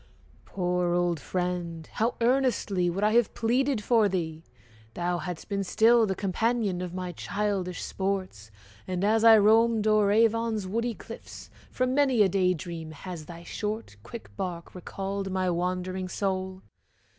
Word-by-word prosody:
Poor 180 -2 0
old 175 -2 +1
friend! 175 -2 -3
How 230 +3 0
earnestly 230 -7 +2
Would 190 +4 -2
I 210 - +4
have 235 -2 +3
pleaded 250 0 +1
for 220 -2 +3
thee! 165 -4 -3 0.5
thou 175 0 -1
hadst 180 -2 -6
been 200 -1 -1
Still 225 +4 +4
the 190 - -1
companion 200 0 0
of 180 -1 -4
my 180 -1 -4
childish 190 0 -2
sports: 190 - -3 0.4
And 185 0 -2
as 220 +2 +3
I 225 -1 +9
roamed 220 +1 +4
o'er 215 -2 +4
Avon's 225 -1 +2
woody 230 +4 -2
cliffs, - - -11 0.2
From 255 0 0
many 265 -6 +4
a 195 - +3
day 185 -1 +2
dream 165 -1 -7
has 165 0 -8
thy 170 0 -10
short 210 - -4
quick 100 -2 -10
bark 175 - -5
Recalled 195 +2 -4
my 185 -1 0
wandering 185 +1 -2
soul. 190 -1 -3
190 Hz, 150 wpm, -27 LUFS, 180-220 Hz, 0.5 s, I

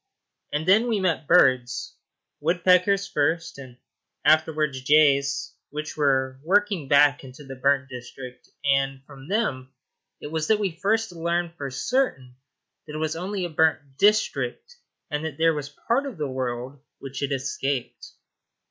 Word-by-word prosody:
And 150 +3 -2
then 215 +6 +5
we 220 -3 +1
met 170 -5 -1
birds 130 -8 +3 0.5
woodpeckers 180 +4 +3
first, 165 -1 -1
and 130 -3 -11 0.5
afterwards 155 -3 +2
jays, 140 -1 +3 0.2
which 150 0 -6
were 130 -3 +1
working 195 -3 +1
back 145 +1 +4
into 130 +2 -12
the 135 -1 -9
burnt 140 +1 +1
district, 125 0 -10 0.2
and 135 -1 +1
from 135 -1 -13
them 135 - -2 0.4
it 145 - -8
was 160 -1 -2
that 220 - +4
we 200 -3 -1
first 215 +6 0
learned 170 0 -2
for 140 -5 -6
certain 135 - -1 0.5
that 150 - -8
it - - -3
was 155 0 -2
only 185 +2 -3
a - - -4
burnt 150 -3 +1
district, 215 - +1 0.4
and 150 +1 -2
that 160 -3 -5
there 165 0 +3
was 145 -2 -5
part 240 - -1
of 250 -9 -8
the 150 -2 -2
world 130 +1 -4 0.2
which 135 -1 -8
had 140 0 -2
escaped. 135 -1 -3
150 Hz, 150 wpm, -25 LUFS, 135-175 Hz, 0.5 s, then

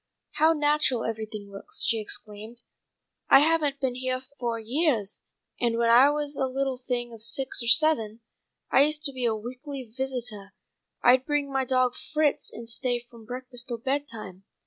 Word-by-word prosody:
"How 315 +2 +5
natural 295 -5 +1
everything 215 -2 -5
looks," 410 - -5
she 230 - +1
exclaimed. 215 +2 -6 0.7
"I - - +9
haven't 300 -3 +2
been 265 -2 -1
heah 255 +1 -2 0.2
for 235 -2 -1
yeahs, 230 - 0 0.4
and 235 -1 +1
when 230 0 +3
I 255 +4 +7
was 295 -1 -1
a 265 - +1
little 265 0 -2
thing 245 -2 -3
of 225 - -8
six 245 +4 +1
or 235 - -4
seven 235 -7 +4 0.5
I - - +6
used 300 +1 +2
to 280 - -1
be 255 -2 -2
a 225 -2 +2
weekly 255 +5 -7
visitah. 245 -7 -4 0.5
I'd 255 +1 +5
bring 290 -2 0
my 265 -1 +1
dawg 255 -1 +2 0.2
Fritz, 305 -2 +1
and 230 +1 -9
stay 245 +2 0
from 230 -2 -14
breakfast 250 +1 -5
till 240 - -3
bedtime. 230 -7 -4
250 Hz, 170 wpm, -26 LUFS, 230-280 Hz, 0.7 s, I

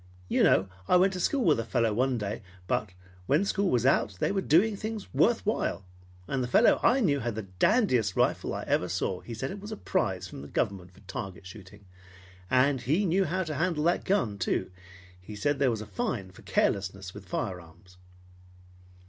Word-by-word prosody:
You - - +1
know 95 +1 +4 0.2
I - - +4
went 190 +2 +4
to 185 - -4
school 265 +6 +1
with 150 -7 +4
a - - -1
fellow 115 -1 0
one 130 +3 +1
day, 105 +1 -4 0.2
but 105 +3 -1 0.4
when 150 +8 +3
school 200 -1 0
was 120 -4 +1
out 115 -7 +2
they - - +1
were 195 -1 0
doing 190 +7 +3
things 215 0 -6
worth 230 -1 +2
while. 100 - -1 0.4
And 135 -2 -1
the - - -2
fellow 220 - +5
I 260 +2 +4
knew 145 - +2
had 120 -3 -3
the 110 - -4 0.2
dandiest 125 - +3
rifle - - +1
I - - -4
ever - - 0
saw. 90 - -1
He 115 - -8
said 135 +5 -4
it 200 - -7
was 210 +2 -8
a 215 - -5
prize 95 - -1
from 75 - -9
the 70 - -9
government 90 +3 -2
for 95 +2 -20
target 95 -2 -7
shooting. 100 +1 -12 0.6
And 130 0 +3
he 160 - +1
knew 190 +2 +2
how 185 +3 -1
to 160 -3 -4
handle 160 0 0
that 175 +2 +2
gun, 115 - 0
too. 95 0 -1 0.5
He 105 +4 -9
said 145 +7 0
there 140 -2 +3
was 110 -3 -2
a - - -6
fine 100 -1 -3
for - - -16
carelessness 95 -1 -1
with 95 - -11
firearms. 90 0 -6
125 Hz, 205 wpm, -28 LUFS, -, 0.6 s, fellow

